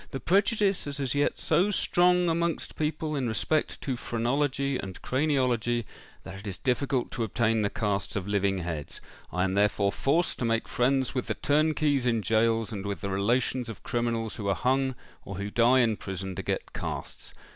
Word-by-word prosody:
"The 135 Hz, -, -5 dB
prejudice 200 Hz, -, +2 dB
is 140 Hz, 0 st, -5 dB
as 135 Hz, -3 st, 0 dB
yet 145 Hz, 0 st, +1 dB
so 190 Hz, +4 st, +2 dB
strong 180 Hz, -2 st, +3 dB
amongst 170 Hz, 0 st, -1 dB
people, 155 Hz, 0 st, -2 dB
in 135 Hz, -3 st, -1 dB
respect 130 Hz, +8 st, 0 dB
to 130 Hz, -, -2 dB
phrenology 135 Hz, +3 st, 0 dB
and 95 Hz, -2 st, -6 dB
craniology, 125 Hz, -5 st, +1 dB, 0.4 s
that 95 Hz, 0 st, -8 dB
it 100 Hz, -, -9 dB
is 95 Hz, -, -4 dB
difficult 130 Hz, 0 st, 0 dB
to 115 Hz, -, -2 dB
obtain 110 Hz, +1 st, +1 dB
the 100 Hz, -, +1 dB
casts 100 Hz, -3 st, -2 dB
of 100 Hz, -2 st, -2 dB
living 100 Hz, -1 st, +1 dB
heads: 80 Hz, -5 st, -5 dB, 0.3 s
I 90 Hz, +1 st, 0 dB
am 95 Hz, 0 st, 0 dB
therefore 100 Hz, 0 st, +2 dB
forced 160 Hz, +10 st, +1 dB
to 120 Hz, -, 0 dB
make 115 Hz, 0 st, 0 dB
friends 130 Hz, +1 st, +1 dB
with 125 Hz, -2 st, -2 dB
the -, -, -1 dB
turnkeys 150 Hz, -3 st, +2 dB
in 115 Hz, -2 st, +2 dB
gaols 115 Hz, +2 st, +2 dB
and 100 Hz, -3 st, -4 dB
with 100 Hz, 0 st, -4 dB
the 100 Hz, -, -3 dB
relations 120 Hz, +5 st, 0 dB
of 115 Hz, -, -9 dB
criminals 115 Hz, -2 st, -1 dB
who 100 Hz, -, -4 dB
are 100 Hz, -, +2 dB
hung 130 Hz, +1 st, +1 dB, 0.3 s
or 100 Hz, -, -7 dB
who 100 Hz, +2 st, -4 dB
die 120 Hz, +3 st, +5 dB
in 115 Hz, -3 st, +2 dB
prison, 95 Hz, 0 st, -5 dB
to -, -, -3 dB
get -, -, -3 dB
casts. -, -, -6 dB
120 Hz, 190 wpm, -28 LUFS, 105-140 Hz, 0.4 s, die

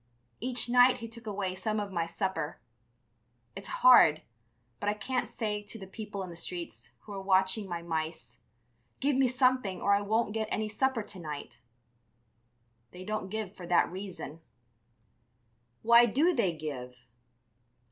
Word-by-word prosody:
Each 250 Hz, +1 st, 0 dB
night 245 Hz, +1 st, +6 dB
he 230 Hz, -, -7 dB
took 230 Hz, 0 st, -12 dB
away 195 Hz, -3 st, -2 dB
some 215 Hz, +3 st, -2 dB
of 205 Hz, -1 st, -4 dB
my 170 Hz, -3 st, -1 dB
supper. 165 Hz, -2 st, -3 dB, 1.0 s
It's 195 Hz, 0 st, -6 dB, 0.2 s
hard, 160 Hz, -12 st, +8 dB, 0.6 s
but 205 Hz, -, 0 dB
I 210 Hz, -, 0 dB
can't 250 Hz, +5 st, -2 dB
say 210 Hz, -3 st, -2 dB
to 210 Hz, +2 st, -7 dB
the 195 Hz, -, -8 dB
people 205 Hz, 0 st, -6 dB
in 180 Hz, -, -7 dB
the -, -, -9 dB
streets, 165 Hz, -9 st, -6 dB
who 210 Hz, -, -10 dB
are 195 Hz, -, -5 dB
watching 190 Hz, +1 st, +2 dB
my 170 Hz, -1 st, -4 dB
mice: 160 Hz, -7 st, -4 dB, 0.6 s
'Give 285 Hz, 0 st, +1 dB
me 265 Hz, 0 st, +4 dB
something 255 Hz, -6 st, +1 dB
or 200 Hz, -, +3 dB
I 200 Hz, -, +3 dB
won't 215 Hz, +1 st, 0 dB
get 220 Hz, -1 st, -1 dB
any 215 Hz, 0 st, -1 dB
supper 260 Hz, +1 st, 0 dB
to 200 Hz, -2 st, -8 dB
night!' 150 Hz, -6 st, -7 dB, 1.3 s
They 180 Hz, +1 st, -10 dB
don't 215 Hz, -2 st, -3 dB
give 210 Hz, -1 st, -4 dB
for 175 Hz, -, -9 dB
that 175 Hz, -1 st, +3 dB
reason." 175 Hz, -4 st, -7 dB, 1.4 s
"Why 235 Hz, +1 st, +7 dB
do 305 Hz, +10 st, +3 dB
they 215 Hz, -, +2 dB
give?" 130 Hz, -5 st, -7 dB
200 Hz, 155 wpm, -30 LUFS, 175-225 Hz, 1.4 s, hard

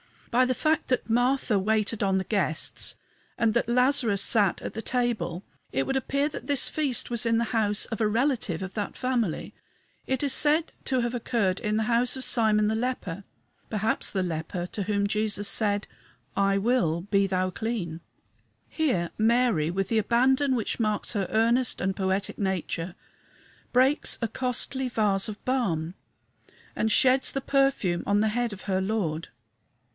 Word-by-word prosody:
By 255 Hz, +2 st, +4 dB
the 255 Hz, 0 st, 0 dB
fact 310 Hz, +3 st, +1 dB
that 255 Hz, -2 st, 0 dB
Martha 245 Hz, -2 st, +2 dB
waited 215 Hz, +2 st, 0 dB
on 195 Hz, -2 st, +2 dB
the 190 Hz, -, 0 dB
guests 190 Hz, -6 st, -1 dB, 0.4 s
and 225 Hz, -2 st, +2 dB
that 235 Hz, -, +1 dB
Lazarus 250 Hz, -4 st, +3 dB
sat 200 Hz, -3 st, +3 dB
at -, -, -6 dB
the 225 Hz, -, -5 dB
table 220 Hz, -9 st, -1 dB, 0.3 s
it 135 Hz, +1 st, 0 dB
would 270 Hz, -, 0 dB
appear 280 Hz, +3 st, 0 dB
that -, -, -8 dB
this 285 Hz, -3 st, +2 dB
feast 285 Hz, -6 st, -2 dB
was 235 Hz, -2 st, -1 dB
in 230 Hz, 0 st, +2 dB
the 230 Hz, -, +2 dB
house 210 Hz, -2 st, +1 dB
of 225 Hz, -, -5 dB
a 215 Hz, -, +3 dB
relative 225 Hz, -, 0 dB
of 190 Hz, 0 st, -6 dB
that 205 Hz, -2 st, -4 dB
family. 240 Hz, -9 st, -2 dB, 0.5 s
It 265 Hz, +1 st, -1 dB
is 280 Hz, -2 st, +2 dB
said 305 Hz, +4 st, +3 dB
to 260 Hz, -2 st, +1 dB
have 240 Hz, 0 st, -2 dB
occurred 225 Hz, -6 st, 0 dB
in 210 Hz, -2 st, -1 dB
the 220 Hz, -, +1 dB
house 240 Hz, +2 st, +2 dB
of 260 Hz, -, -3 dB
"Simon 215 Hz, -4 st, +2 dB
the 220 Hz, -, 0 dB
Leper" 220 Hz, -6 st, -3 dB, 0.4 s
perhaps 220 Hz, 0 st, 0 dB
the 190 Hz, -2 st, -1 dB
leper 170 Hz, +1 st, -3 dB
to 200 Hz, -, -4 dB
whom 200 Hz, 0 st, 0 dB
Jesus 205 Hz, 0 st, 0 dB
said, 205 Hz, -2 st, +1 dB, 0.5 s
"I 195 Hz, 0 st, +2 dB
will 200 Hz, -7 st, +1 dB
be 195 Hz, +1 st, +1 dB
thou 185 Hz, -1 st, 0 dB
clean." 190 Hz, -6 st, -4 dB, 0.7 s
Here 220 Hz, -, 0 dB
Mary, 225 Hz, -8 st, +2 dB
with 195 Hz, +2 st, -2 dB
the 225 Hz, -, +2 dB
abandon 260 Hz, +5 st, +2 dB
which 230 Hz, 0 st, -2 dB
marks 215 Hz, -2 st, -1 dB
her 200 Hz, -5 st, -1 dB
earnest 230 Hz, +3 st, +2 dB
and 190 Hz, +1 st, 0 dB
poetic 190 Hz, +1 st, -1 dB
nature, 185 Hz, -3 st, -2 dB, 0.8 s
breaks 260 Hz, +4 st, +3 dB
a 230 Hz, -, -1 dB
costly 255 Hz, +2 st, -1 dB
vase 205 Hz, -5 st, +1 dB
of 215 Hz, -1 st, -8 dB
balm 180 Hz, -11 st, -1 dB, 0.8 s
and 220 Hz, -, 0 dB
sheds 260 Hz, +2 st, +3 dB
the 275 Hz, -, -2 dB
perfume 270 Hz, -11 st, +1 dB
on 205 Hz, +1 st, +3 dB
the 220 Hz, -, +2 dB
head 240 Hz, +1 st, -1 dB
of 190 Hz, -, -10 dB
her 190 Hz, -2 st, 0 dB
Lord. 190 Hz, -6 st, -2 dB
220 Hz, 170 wpm, -26 LUFS, 195-250 Hz, 0.8 s, By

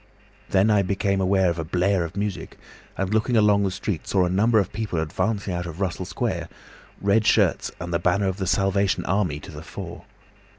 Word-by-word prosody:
"Then 100 Hz, +3 st, +3 dB
I 105 Hz, -1 st, +4 dB
became 100 Hz, 0 st, 0 dB
aware 95 Hz, -1 st, +3 dB
of 85 Hz, -, -5 dB
a -, -, -1 dB
blare 90 Hz, +3 st, +1 dB
of 85 Hz, +3 st, -7 dB
music, 100 Hz, -1 st, -4 dB, 0.4 s
and 95 Hz, +1 st, -1 dB
looking 110 Hz, +2 st, +2 dB
along 105 Hz, -1 st, +4 dB
the 100 Hz, -, +1 dB
street 95 Hz, -2 st, -4 dB
saw 95 Hz, -2 st, +2 dB
a 90 Hz, -, -1 dB
number 110 Hz, +5 st, +3 dB
of 100 Hz, -, +1 dB
people 105 Hz, -5 st, -2 dB
advancing 100 Hz, +5 st, -1 dB
out 85 Hz, 0 st, -3 dB
of 85 Hz, +1 st, -8 dB
Russell 95 Hz, -1 st, -2 dB
Square, -, -, -3 dB, 0.5 s
red 100 Hz, +2 st, +3 dB
shirts, -, -, +2 dB
and 85 Hz, -1 st, -5 dB
the 85 Hz, -, +2 dB
banner 95 Hz, +2 st, +1 dB
of 95 Hz, 0 st, -2 dB
the 95 Hz, -2 st, -3 dB
Salvation 95 Hz, +1 st, +1 dB
Army 95 Hz, -7 st, 0 dB
to -, -, -10 dB
the -, -, -9 dB
fore. -, -, -8 dB
95 Hz, 205 wpm, -24 LUFS, 90-100 Hz, 0.5 s, I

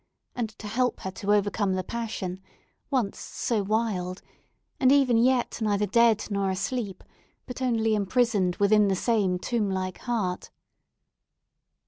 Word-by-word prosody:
—and 235 Hz, -3 st, -2 dB
to -, -, -10 dB
help 245 Hz, +4 st, 0 dB
her 190 Hz, -, -4 dB
to 200 Hz, +2 st, -2 dB
overcome 205 Hz, -1 st, +1 dB
the 185 Hz, -, -2 dB
passion, 195 Hz, -4 st, -4 dB, 0.5 s
once 250 Hz, -8 st, -1 dB
so 225 Hz, -4 st, -2 dB
wild, 200 Hz, -3 st, -1 dB, 0.6 s
and 260 Hz, 0 st, +5 dB
even 275 Hz, -4 st, +4 dB
yet 245 Hz, +1 st, +2 dB
neither 210 Hz, -1 st, +1 dB
dead 230 Hz, +1 st, +3 dB
nor 200 Hz, -1 st, 0 dB
asleep, 195 Hz, +1 st, -3 dB, 0.4 s
but 250 Hz, +1 st, -8 dB
only 225 Hz, -3 st, +1 dB
imprisoned 205 Hz, -3 st, +1 dB
within 205 Hz, +1 st, +4 dB
the 195 Hz, -, +1 dB
same 200 Hz, -4 st, +1 dB
tomb 215 Hz, +1 st, -1 dB
like 185 Hz, -1 st, -3 dB
heart? 210 Hz, -7 st, -2 dB
210 Hz, 135 wpm, -26 LUFS, 190-235 Hz, 0.6 s, and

